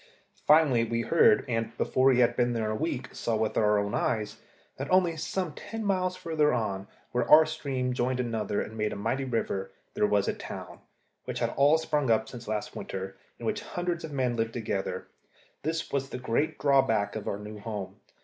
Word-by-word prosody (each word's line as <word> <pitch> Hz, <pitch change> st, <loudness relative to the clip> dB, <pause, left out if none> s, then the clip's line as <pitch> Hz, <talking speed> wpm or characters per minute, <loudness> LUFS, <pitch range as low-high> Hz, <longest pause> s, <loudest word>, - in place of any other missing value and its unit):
Finally 150 Hz, -6 st, +5 dB
we 115 Hz, 0 st, -1 dB
heard, 170 Hz, -, +4 dB
and, 115 Hz, -1 st, -2 dB
before 130 Hz, +1 st, +2 dB
we 130 Hz, -2 st, +5 dB
had 120 Hz, -, +3 dB
been 120 Hz, 0 st, +2 dB
there 110 Hz, -2 st, -1 dB
a -, -, -1 dB
week, 135 Hz, -2 st, -2 dB
saw 115 Hz, -, -1 dB
with 110 Hz, 0 st, 0 dB
our 105 Hz, -1 st, +3 dB
own 100 Hz, 0 st, -1 dB
eyes, 110 Hz, -3 st, -1 dB, 0.4 s
that 135 Hz, +2 st, -4 dB
only 185 Hz, -3 st, +3 dB
some 165 Hz, +1 st, -3 dB
ten 225 Hz, +6 st, -6 dB
miles 185 Hz, -2 st, +1 dB
further 155 Hz, -4 st, +1 dB
on, 100 Hz, -3 st, -2 dB, 0.2 s
where 120 Hz, -1 st, 0 dB
our 155 Hz, +1 st, +9 dB
stream 135 Hz, -5 st, -2 dB
joined 125 Hz, +1 st, 0 dB
another 110 Hz, -4 st, -1 dB
and 110 Hz, -, -4 dB
made 105 Hz, -1 st, -1 dB
a -, -, -4 dB
mighty 130 Hz, +7 st, -1 dB
river, 115 Hz, -6 st, -2 dB, 0.2 s
there 105 Hz, -, +2 dB
was 100 Hz, -1 st, +2 dB
a -, -, +1 dB
town, -, -, -8 dB, 0.5 s
which -, -, -4 dB
had -, -, 0 dB
all 145 Hz, +3 st, +5 dB
sprung 150 Hz, -4 st, 0 dB
up 110 Hz, -1 st, +3 dB
since 120 Hz, -1 st, -9 dB
last 105 Hz, -1 st, -3 dB
winter, 95 Hz, 0 st, -5 dB, 0.2 s
in -, -, -8 dB
which -, -, -1 dB
hundreds 175 Hz, -1 st, -3 dB
of 160 Hz, -, -6 dB
men 130 Hz, -4 st, 0 dB
lived 115 Hz, 0 st, -1 dB
together. 105 Hz, -4 st, -3 dB, 0.6 s
This 160 Hz, +2 st, -2 dB
was 135 Hz, -1 st, -1 dB
the -, -, -5 dB
great 130 Hz, +5 st, 0 dB
drawback 135 Hz, -7 st, +2 dB
of 110 Hz, -, -5 dB
our 100 Hz, -, -1 dB
new 105 Hz, +1 st, -8 dB
home. 100 Hz, -3 st, -6 dB
125 Hz, 200 wpm, -28 LUFS, 110-150 Hz, 0.6 s, our